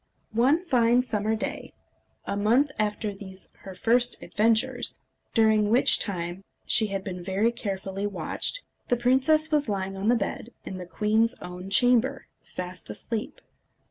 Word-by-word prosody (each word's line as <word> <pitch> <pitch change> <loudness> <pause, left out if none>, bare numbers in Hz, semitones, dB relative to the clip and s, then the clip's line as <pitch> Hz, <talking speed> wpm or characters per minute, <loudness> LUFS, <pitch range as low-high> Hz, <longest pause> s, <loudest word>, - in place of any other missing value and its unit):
_ - - -16
One 275 +9 +3
fine 245 -6 +3
summer 215 -2 -1
day, 220 - -5 0.5
a - - -2
month 235 +8 +3
after 210 0 -1
these 190 -1 -11
her 190 -1 -10
first 240 +5 +2
adventures, 230 +4 +1 0.4
during 220 -2 +4
which 240 +4 +4
time 180 -1 -3 0.2
she 220 - +2
had 195 -1 -3
been 180 -2 -6
very 200 +5 +1
carefully 195 -3 -4
watched, - - -2 0.2
the 245 - +2
princess 265 +6 +2
was 295 -5 +1
lying 195 -1 -2
on 195 +2 -3
the 240 - +5
bed 225 +1 -3 0.2
in 185 - -6
the 180 - -7
queen's 215 +7 +1
own 180 +1 -8
chamber, 245 +4 +3 0.2
fast 180 -4 -6
asleep. 215 - -4
215 Hz, 150 wpm, -26 LUFS, 195-245 Hz, 0.5 s, the